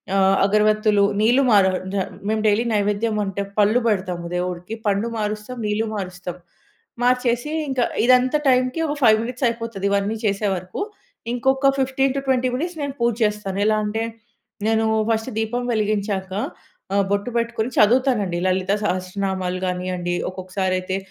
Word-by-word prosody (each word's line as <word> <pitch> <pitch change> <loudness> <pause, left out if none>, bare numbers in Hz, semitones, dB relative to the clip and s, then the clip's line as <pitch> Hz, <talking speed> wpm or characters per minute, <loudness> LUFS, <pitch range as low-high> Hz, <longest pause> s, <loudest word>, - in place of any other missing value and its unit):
ఆహ్, 195 0 +4
అగరవత్తులు 210 0 +3 0.2
నీళ్లు 240 +5 +4
మా 230 - +5
రా 190 - +3 0.2
జ - - -2 0.3
మేము 215 0 0
డైలీ 215 +2 +3
నైవేద్యం 210 +1 0
అంటే, 195 0 -3 0.2
పళ్ళు 210 +3 +4
పెడతాము 185 -4 -1
దేవుడికి. 180 +2 -3
పండు 205 +2 +1
మారుస్తాం. 210 +3 -4
నీళ్లు 210 +1 0
మారుస్తాం. 180 -3 -5 0.7
మార్చేసి 250 +2 +1 0.2
ఇంకా 260 -2 +1 0.2
ఇదంతా 255 +3 +4
టైమ్‌కి 255 +3 +2
ఒక 290 - -2
5 220 -4 +6
మినిట్స్ 250 +2 -2
అయిపోతది. 230 -4 -4
ఇవన్నీ 200 +2 0
చేసే 205 0 +1
వరకూ. 185 - -6 0.5
ఇంకొక 265 +3 +2
15-20 265 -1 +1
మినిట్స్ 335 +5 -3
నేను 280 -1 -3
పూజ 235 0 +3
చేస్తాను. 210 -2 -1
ఎలా 215 0 +3
అంటే, 220 +2 -1 0.6
నేను 225 0 +2 0.3
ఫస్ట్ 225 +3 -1
దీపం 240 +3 -2
వెలిగించాక. 205 -3 -1 0.6
ఆహ్, 200 -1 +3
బొట్టు 200 +4 0
పెట్టుకొని 235 0 -2
చదువుతాను 245 +1 +4
అండి. 175 -1 -2
లలిత 185 +1 0
సహస్రనామాలు 185 -1 -2
గానివ్వండి. 180 -1 -2 0.2
ఒక్కొక్కసారైతే 185 0 -2
215 Hz, 140 wpm, -22 LUFS, 195-245 Hz, 0.7 s, 5